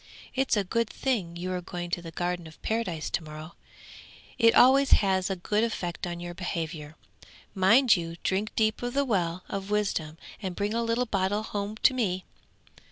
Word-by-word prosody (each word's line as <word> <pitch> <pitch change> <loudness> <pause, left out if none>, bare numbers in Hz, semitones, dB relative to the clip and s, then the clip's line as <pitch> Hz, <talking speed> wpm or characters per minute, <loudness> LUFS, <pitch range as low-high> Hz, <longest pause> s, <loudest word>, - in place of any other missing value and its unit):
'It's 265 -3 +1
a 205 - +2
good 230 +4 0
thing 205 -11 -1
you 180 +2 -4
are 180 - -2
going 175 0 -6
to 175 - -1
the 170 - -8
Garden 175 0 -3
of 160 - -15
Paradise 215 -8 -1
to - - -1
morrow; 155 +1 -9 0.9
it 230 -1 +6
always 270 +2 +6
has 190 -2 +3
a 195 - 0
good 210 +4 0
effect 180 -6 -3
on 175 0 -5
your 175 0 -6
behaviour. 160 -4 -4 0.6
Mind 220 +6 +5
you 165 -2 -4
drink 200 +3 0
deep 220 0 +1
of 245 +1 -3
the 280 0 +2
well 180 -6 0
of 195 0 -5
wisdom, 195 -7 -1 0.2
and 185 -3 -4
bring 205 +3 -1
a 230 - +1
little 230 +2 +1
bottleful 205 0 0
home 205 +1 -3
to - - +6
me.' 190 -7 -1
190 Hz, 185 wpm, -28 LUFS, 175-225 Hz, 0.9 s, it